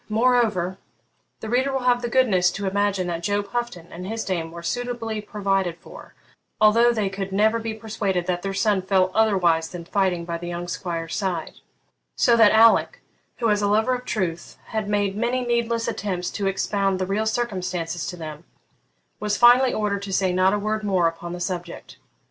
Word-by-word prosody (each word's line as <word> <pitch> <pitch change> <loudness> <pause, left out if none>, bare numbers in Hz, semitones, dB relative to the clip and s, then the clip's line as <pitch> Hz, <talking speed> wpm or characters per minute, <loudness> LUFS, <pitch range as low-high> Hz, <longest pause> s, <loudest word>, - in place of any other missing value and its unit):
Moreover, 215 -6 +1 0.6
the 220 - -5
reader 260 +4 +1
will 265 -1 -1
have 245 -1 +3
the 240 - -3
goodness 210 -9 +3
to 200 - -4
imagine 200 -1 0
that 170 -1 -3
Job 205 +2 -1
Houghton 240 -9 -4
and 180 +2 -7
his 225 +2 -4
dame 170 -4 -2
were 170 +1 -10
suitably 235 0 -3
provided 195 -4 -1
for, - - -14 0.4
although 230 +3 +5
they 215 -4 -1
could 195 0 -5
never 215 +4 +2
be 225 -1 -4
persuaded 205 -5 -2
that 175 -1 -1
their 195 - -3
son 195 0 +2
fell 185 0 +2
otherwise 180 -7 +2
than 175 -2 -8
fighting 180 -2 0
by 170 -1 -4
the 175 - -7
young 175 0 -5
squire's 170 -2 -4
side; 180 -5 -3 0.6
so 235 - +4
that 225 -3 +6
Alick, 225 +1 +4 0.3
who, 230 -3 +1
as 210 0 +1
a 205 - +1
lover 220 +5 +2
of 250 0 -3
truth, 180 -7 -3
had 215 -2 -3
made 205 -1 0
many 240 +3 -1
needless 235 -1 0
attempts 185 -3 -3
to 200 -2 -2
expound 195 0 0
the 185 - -1
real 205 +3 -1
circumstances 185 -7 -2
to 180 - -6
them, 155 -1 -8 0.8
was 210 0 -1
finally 245 +2 +6
ordered 205 -2 -1
to 200 -1 -6
say 190 -1 +1
not 185 +1 +3
a 210 - +1
word 215 +1 -2
more 185 -4 +2
upon 165 +1 -5
the 175 - -6
subject. 175 -1 -5
200 Hz, 190 wpm, -23 LUFS, 180-220 Hz, 0.8 s, that